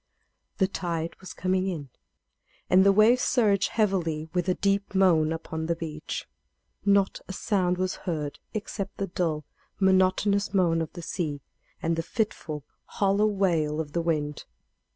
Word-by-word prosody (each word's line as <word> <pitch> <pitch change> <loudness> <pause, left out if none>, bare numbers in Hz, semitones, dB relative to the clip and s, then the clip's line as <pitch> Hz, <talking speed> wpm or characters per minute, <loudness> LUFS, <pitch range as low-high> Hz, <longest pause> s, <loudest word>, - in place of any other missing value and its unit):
The 190 - +3
tide 170 -3 -3
was 190 - -9
coming 185 +1 0
in, 155 -7 -4 0.8
and 185 +1 +7
the 200 - +6
waves 220 +5 +5
surged 205 -6 +3
heavily 170 -8 0
with 180 0 0
a 180 - +2
deep 200 0 0
moan 165 -5 +4
upon 160 0 -4
the 170 - +1
beach. 155 -2 -5 0.6
Not 200 -1 +3
a 190 - -5
sound 185 -3 +1
was 185 0 -1
heard 150 -5 -4 0.2
except 205 -1 -4
the 195 - -1
dull, 165 -5 -2 0.3
monotonous 190 +1 +3
moan 170 -3 +3
of 160 - -4
the 175 - -8
sea, 155 -5 -3 0.4
and 165 +1 +1
the 165 - -1
fitful, 165 - -3 0.2
hollow 200 +1 +2
wail 170 -7 +1
of 150 -2 -4
the 170 - +1
wind. 150 -3 -1
180 Hz, 150 wpm, -27 LUFS, 160-195 Hz, 0.8 s, and